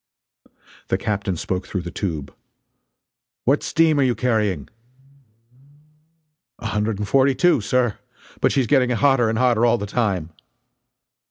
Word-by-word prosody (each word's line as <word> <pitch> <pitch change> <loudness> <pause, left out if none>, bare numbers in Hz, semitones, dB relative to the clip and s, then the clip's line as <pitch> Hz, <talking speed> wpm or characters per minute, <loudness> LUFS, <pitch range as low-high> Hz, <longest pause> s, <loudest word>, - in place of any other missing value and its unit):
The - - 0
captain 100 -3 -2
spoke 90 +2 -3
through 95 -3 -4
the 85 - -6
tube: 80 -8 -4 1.1
"What 140 +4 +3
steam 160 -2 +2
are - - +4
you 125 -2 +1
carrying?" 105 - 0 1.9
"A 120 - -11
hundred 105 -1 -1
and 105 0 -4
forty 135 +4 +3
two, 135 -1 +3
sir! 120 +1 0 0.4
But - - +2
she's 135 -3 +1
getting 130 0 +3
hotter 125 -1 +3
and 110 - -1
hotter 120 -2 +2
all 120 0 +4
the 105 - -4
time." 100 -7 -1
115 Hz, 140 wpm, -21 LUFS, 100-130 Hz, 1.9 s, are